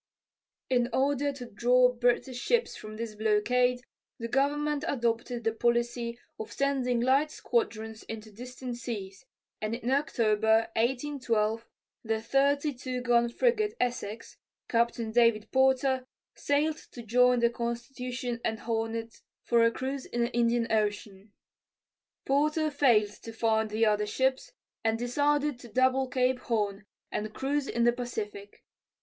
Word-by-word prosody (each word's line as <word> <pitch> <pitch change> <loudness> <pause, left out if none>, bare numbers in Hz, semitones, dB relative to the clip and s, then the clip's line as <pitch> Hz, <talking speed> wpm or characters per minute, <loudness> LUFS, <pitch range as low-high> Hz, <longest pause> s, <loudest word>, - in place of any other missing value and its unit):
In 245 -2 +2
order 285 +2 +1
to 260 -3 -8
draw 250 +3 +3
British 245 +1 0
ships 475 - +1
from 215 0 -9
this 230 -1 -4
blockade, 245 +4 +2 0.4
the 230 - -4
government 290 +3 0
adopted 235 -1 -1
the 225 0 +1
policy 235 0 0 0.2
of 220 - -6
sending 265 -3 0
light 270 +5 +3
squadrons 225 - -2
into 220 -1 -7
distant 250 +2 -7
seas, 200 -5 -6 0.4
and 215 +1 -1
in 245 +1 -3
October, 220 -5 +2
1812, 235 -3 0 0.4
the 225 -1 -1
32 275 0 0
gun 240 -1 +3
frigate 430 - +1
Essex, 235 -3 -3 0.3
Captain 235 -1 0
David 230 -2 +3
Porter, 265 0 +2 0.3
sailed 300 +2 0 0.2
to 240 - -8
join 250 +2 +4
the 235 0 +3
Constitution 240 +1 -4
and 220 -1 -2
Hornet 225 0 -3 0.2
for 235 -1 +3
a 230 - +6
cruise 265 +3 -4
in 240 - -2
the 235 +1 0
Indian 235 0 +2
Ocean. 205 -1 -2 0.9
Porter 305 +3 +1
failed 235 -8 +3
to 230 - -8
find 220 -1 +1
the 220 +2 +2
other 210 -1 +2
ships 265 - 0 0.3
and 225 0 +1
decided 285 +3 +1
to 245 - -11
double 260 +3 +2
Cape 255 0 +1
Horn 205 -3 -2 0.2
and 215 +1 -4
cruise 280 +1 -1
in 235 - 0
the 240 0 +4
Pacific. 210 -5 -6
240 Hz, 135 wpm, -29 LUFS, 225-265 Hz, 0.9 s, a